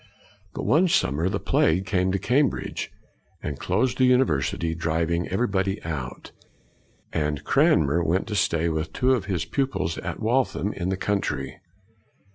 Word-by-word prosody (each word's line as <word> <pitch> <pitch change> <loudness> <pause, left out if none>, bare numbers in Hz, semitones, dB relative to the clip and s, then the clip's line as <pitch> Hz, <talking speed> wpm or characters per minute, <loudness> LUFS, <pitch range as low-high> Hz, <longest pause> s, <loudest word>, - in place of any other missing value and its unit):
But, - - -4
one 170 +6 +4
summer, 80 - +1
the 100 +1 -2
plague 90 +5 +2
came 95 -1 +1
to 100 - +1
Cambridge, 130 +7 0 0.5
and 70 -2 -4
closed 120 +9 0
the 130 - +5
university, 85 - +2
driving 85 +1 -1
everybody 95 -1 0
out; 75 -6 -5 0.8
and 75 -2 -1
Cranmer 80 +2 +3
went 90 +4 +1
to 105 - -2
stay 85 -3 +1
with 80 -1 -2
two 130 +1 +2
of 115 -7 -1
his 95 -6 -2
pupils 135 - -1
at - - -5
Waltham, 115 -3 0
in 90 0 -3
the 95 - -1
country. 100 +1 -2
90 Hz, 145 wpm, -25 LUFS, 80-110 Hz, 0.8 s, the